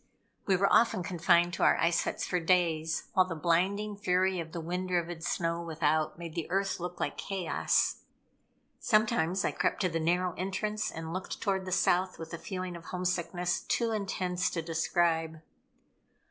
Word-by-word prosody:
We 195 - +4
were 195 +2 +2
often 225 -5 +4
confined 175 0 +3
to - - -1
our - - +5
ice 170 +1 +2
huts - - -2
for 180 - 0
days 165 -2 +1
while 185 -1 +4
the 165 - -4
blinding 190 +6 +1
fury 185 -2 +1
of 165 -1 -6
the 170 - -5
wind 180 +3 -3
driven 175 -2 -1
snow 170 0 -1
without 155 -1 0
made 170 -2 -7
the 165 -1 -4
earth 195 +1 0
look 180 +1 -5
like - - -2
chaos. 190 -4 0 0.8
Sometimes 215 -5 +2
I - - +1
crept - - 0
to 185 - +2
the 165 -1 -1
narrow 175 +2 +1
entrance 210 +3 -2
and 160 0 -6
looked 185 0 -5
toward 195 -2 -1
the 185 - -5
South 185 0 +2
with 165 +1 -8
a 170 - -4
feeling 185 +1 -5
of 170 - -10
homesickness 180 -1 -1
too 230 -1 0
intense 185 -3 -1
to 165 - -3
describe. 165 -1 0
180 Hz, 175 wpm, -30 LUFS, 165-190 Hz, 0.8 s, our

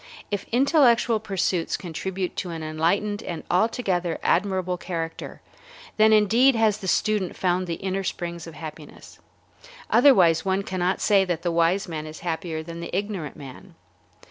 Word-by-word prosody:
If 205 - -3
intellectual 245 -3 +3
pursuits 190 -4 -1
contribute 185 +2 -4
to 180 - -3
an 165 -2 -5
enlightened 175 +7 0
and 170 -6 -6
altogether 180 -4 0
admirable 185 -1 +1
character, 165 -2 -6 0.5
then 220 0 +5
indeed 225 +5 +5
has 220 -2 +2
the 190 - -6
student 205 -1 0
found 180 0 0
the 170 - -2
inner 195 +1 -3
springs 170 -2 -5
of 165 - -10
happiness. 155 -1 -11 0.7
Otherwise 175 - +5
one 190 +1 0
cannot 185 -1 -1
say 200 -2 +4
that 175 -2 -3
the 175 - 0
wise 170 +4 +1
man 155 -2 -5
is 155 0 -10
happier 165 -1 -3
than 165 +1 -8
the 170 - -6
ignorant 195 -7 -4
man. 135 -4 -12
185 Hz, 150 wpm, -24 LUFS, 165-205 Hz, 0.7 s, then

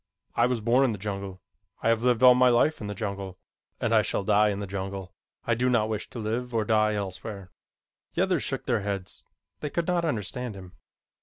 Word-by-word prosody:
I - - +4
was 125 -3 -1
born 120 +5 +4
in 125 -4 +2
the - - -5
jungle. 100 -1 -5 0.4
I - - +3
have 115 -1 +2
lived 125 -1 +2
all 125 0 +10
my 125 0 +5
life 125 +5 +3
in 105 - -4
the 105 - -4
jungle, 100 -3 -5 0.4
and - - 0
I - - +6
shall - - -1
die 105 +1 +4
in 100 -1 -2
the 100 - -3
jungle. 95 -1 -5 0.3
I 120 - +2
do 125 +2 +1
not 110 -3 +2
wish 110 -1 -3
to - - -9
live 115 +2 -3
or 110 -1 +1
die 110 0 +3
elsewhere." 95 -1 -5 0.6
The - - +3
others 185 -6 +1
shook 135 - -2
their 120 -4 +1
heads. 100 -2 -5 0.4
They 150 - -3
could 170 +3 -1
not 175 -1 +1
understand 125 - -3
him. 95 -2 -11
110 Hz, 220 wpm, -27 LUFS, 100-125 Hz, 0.6 s, all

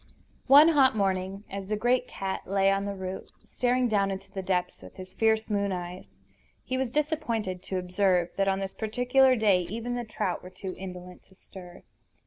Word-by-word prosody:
One 290 +4 +8
hot 275 -7 +4
morning 195 0 -1
as 195 -1 -6
the 215 - -1
great 245 +3 +1
cat 195 -1 -5
lay 195 0 +3
on 195 0 0
the 200 0 -4
root, 190 0 -6
staring 250 0 0
down 200 -3 +1
into 190 0 -6
the 195 - -4
depths 180 -1 -2
with - - -13
his 185 0 -10
fierce 220 0 +1
moon 200 -2 0
eyes, 180 0 -7 0.5
he 260 - -3
was 260 -1 -1
disappointed 235 - -2
to 190 - -3
observe 180 -1 +1
that 195 0 +1
on 195 0 +1
this 195 0 -4
particular 250 +4 +3
day 210 -5 +3
even 230 +7 -4
the 245 0 -2
trout 215 -5 -3
were 180 - -10
too 185 0 -7
indolent 180 -1 -9
to 190 - -23
stir. 180 -2 -13
195 Hz, 190 wpm, -27 LUFS, 185-235 Hz, 0.5 s, One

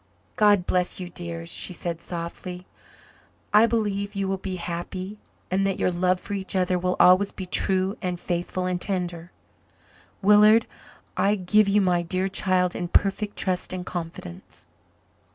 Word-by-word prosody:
"God 205 -4 +4
bless 180 0 +1
you, 180 -1 -6
dears," 170 -1 -6
she 180 - -3
said 170 -1 -4
softly. 180 +1 -6 0.9
"I 215 +2 +7
believe 205 -3 -1
you 195 -1 -1
will 190 0 -2
be 190 -1 -4
happy 185 +3 -5 0.3
and 190 +1 +2
that 195 - -1
your - - +1
love 180 +1 +1
for 205 - -7
each 195 -1 -4
other 180 -1 +1
will 180 +1 0
always 185 +2 +6
be 190 - -7
true 190 +1 +1
and 180 -2 -3
faithful 175 +1 -2
and 180 -1 -2
tender. 175 -3 -3 0.9
Willard, 210 +2 +6 0.5
I 205 +1 +2
give 210 +2 +3
you 200 +1 +3
my 180 -2 +2
dear 185 +2 -1
child 185 -2 +1
in 175 - -3
perfect 200 +3 +1
trust 185 -1 -1
and 180 -1 -5
confidence." 165 - -7
185 Hz, 155 wpm, -25 LUFS, 175-195 Hz, 0.9 s, I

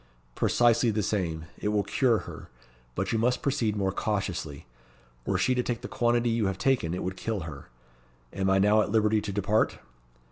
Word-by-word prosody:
"Precisely 120 - +3
the 105 -1 0
same. 85 -6 -2
It - - -3
will 105 -1 +1
cure 120 +3 +2
her. - - -10 0.5
But 95 0 -2
you 115 - +1
must 125 +2 +1
proceed 125 -7 0
more 95 -2 0
cautiously. 95 -9 -3 0.6
Were - - +1
she 130 - +2
to 125 - +1
take 120 -2 -3
the - - -6
quantity 120 0 +1
you 115 -3 +1
have 95 -2 -2
taken, 100 -8 +1
it - - -4
would 95 +1 -3
kill 110 0 -3
her. 75 -5 -9 0.6
Am 95 0 0
I 95 - +4
now 105 +2 +4
at 105 - -1
liberty 110 -1 +3
to 105 - -4
depart?" 100 +2 +1
105 Hz, 190 wpm, -27 LUFS, 95-115 Hz, 0.6 s, I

